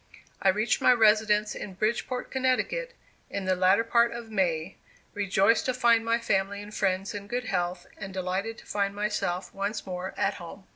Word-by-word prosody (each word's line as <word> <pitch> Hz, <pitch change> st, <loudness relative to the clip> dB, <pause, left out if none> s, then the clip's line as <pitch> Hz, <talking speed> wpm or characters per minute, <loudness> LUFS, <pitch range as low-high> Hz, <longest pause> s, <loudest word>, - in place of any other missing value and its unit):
I 195 Hz, -, +4 dB
reached 215 Hz, +4 st, +1 dB
my -, -, +6 dB
residence 215 Hz, -2 st, +3 dB
in 190 Hz, -, -7 dB
Bridgeport, 235 Hz, +5 st, -2 dB
Connecticut, 265 Hz, -, 0 dB, 0.3 s
in 200 Hz, -1 st, -4 dB
the 185 Hz, 0 st, +2 dB
latter 190 Hz, +4 st, +4 dB
part 235 Hz, 0 st, +3 dB
of 235 Hz, -1 st, -8 dB
May, 175 Hz, -4 st, -1 dB, 0.4 s
rejoiced 200 Hz, +3 st, +2 dB
to 255 Hz, -, 0 dB
find 235 Hz, -2 st, +4 dB
my 230 Hz, 0 st, +2 dB
family 200 Hz, -3 st, 0 dB
and 205 Hz, +1 st, -9 dB
friends 195 Hz, 0 st, 0 dB
in 200 Hz, -1 st, -7 dB
good 245 Hz, +3 st, -3 dB
health, 175 Hz, -3 st, -2 dB
and 195 Hz, -2 st, -6 dB
delighted 190 Hz, +4 st, -3 dB
to -, -, -14 dB
find 200 Hz, -1 st, -1 dB
myself 200 Hz, -3 st, -2 dB
once 200 Hz, +2 st, -3 dB
more 185 Hz, 0 st, -5 dB
at 195 Hz, -, +1 dB
home. 180 Hz, +3 st, -10 dB
205 Hz, 180 wpm, -27 LUFS, 190-230 Hz, 0.4 s, my